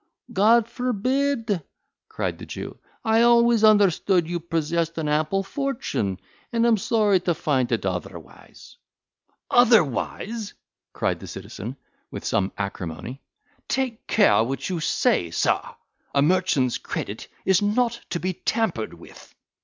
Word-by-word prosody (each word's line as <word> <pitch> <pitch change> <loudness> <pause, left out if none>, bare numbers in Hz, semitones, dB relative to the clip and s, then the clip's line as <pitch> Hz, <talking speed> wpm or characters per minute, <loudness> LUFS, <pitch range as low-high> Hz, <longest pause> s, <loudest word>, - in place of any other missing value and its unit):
"God 220 +3 +4
forbid!" 250 -3 -1 0.5
cried - - -3
the - - -8
Jew, - - -7 0.3
"I 220 +1 +4
always 235 -1 +5
understood 195 -4 +4
you 175 0 -2
possessed 165 0 -1
an 160 -2 -2
ample 155 +6 +1
fortune, 195 - -2 0.3
and 230 0 +2
am 230 -2 +4
sorry 210 -1 +2
to 175 -1 -1
find 135 -6 0
it 115 -4 0
otherwise." 90 -3 -7 0.7
"Otherwise!" 220 - +2 0.4
cried - - -1
the - - -9
citizen, 120 +7 -7 0.3
with - - -7
some 95 -1 0
acrimony, 100 - -5 0.5
"take 255 -4 -2
care 205 - +4
what 135 +7 -3
you 175 - -1
say, 85 - +1
sir; 80 - +1 0.5
a 140 - +4
merchant's 155 -7 +2
credit - - -5 0.2
is 190 -1 +4
not 235 +3 +1
to 170 - -2
be 185 +1 -2
tampered 180 - -2
with." - - -15
185 Hz, 130 wpm, -24 LUFS, 150-230 Hz, 0.7 s, always